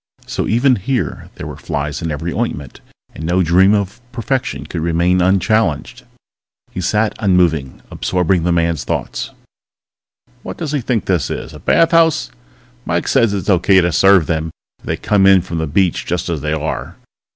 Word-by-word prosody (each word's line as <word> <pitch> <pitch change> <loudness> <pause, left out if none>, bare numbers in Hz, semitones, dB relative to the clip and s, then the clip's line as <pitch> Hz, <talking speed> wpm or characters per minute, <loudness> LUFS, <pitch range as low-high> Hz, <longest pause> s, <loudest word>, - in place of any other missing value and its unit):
So - - -3
even 125 +3 +3
here 120 +6 -3
there - - -8
were - - -7
flies 70 -1 -4
in 85 - -3
every 80 +3 -3
ointment, 75 - -4 0.3
and 80 - -9
no 90 +3 +1
dream 95 +5 +4
of 100 +3 -3
perfection 130 +2 -3
could 85 - -5
remain 85 +2 +1
unchallenged. 95 -2 0 0.7
He 90 - -5
sat 105 +4 +1
unmoving, 85 -9 +1
absorbing 90 -1 0
the 90 +2 0
man's 85 -3 0
thoughts. - - -3 1.1
_What - - -7
does 160 -4 -4
he 145 -3 -1
think 115 -2 -1
this 85 -10 0
is, - - -6
a - - -10
bath 165 +1 +3
house? 160 -7 +3 0.5
Mike - - -2
says 115 -6 +3
it's 100 -3 -3
okay 95 +1 +4
to 85 -1 +1
serve 95 0 +5
them 80 0 -2 0.3
if - - -20
they - - -2
come 100 -2 +2
in 95 -2 +5
from 85 -2 -4
the 80 - -2
beach 90 +4 +1
just 90 0 -2
as 80 -4 -2
they 75 0 -2
are. 75 -5 -4
90 Hz, 175 wpm, -17 LUFS, 80-105 Hz, 1.1 s, serve